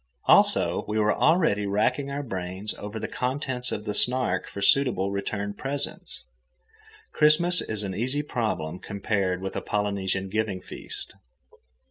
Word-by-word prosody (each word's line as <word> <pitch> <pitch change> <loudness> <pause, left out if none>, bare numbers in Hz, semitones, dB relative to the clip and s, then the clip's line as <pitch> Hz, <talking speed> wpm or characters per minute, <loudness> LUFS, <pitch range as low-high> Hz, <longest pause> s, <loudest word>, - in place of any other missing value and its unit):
Also, - - +5
we 105 - -2
were 105 0 +3
already 155 - +2
racking 125 +8 +1
our 140 +1 -3
brains 95 -2 -3
over 105 +2 -6
the - - -3
contents 125 -1 -2
of 105 - -4
the 105 - -2
Snark 125 -7 +1
for - - -8
suitable 100 -3 +3
return 100 +1 -3
presents. 140 +6 -4 0.9
Christmas 165 +4 +5
is 110 -1 -4
an 95 -2 -3
easy 130 +9 -1
problem 95 - -2
compared 100 -2 -2
with 95 - -4
a - - -2
Polynesian 100 -2 -1
giving 105 -1 -1
feast. - - -8
105 Hz, 140 wpm, -26 LUFS, 100-130 Hz, 0.9 s, Also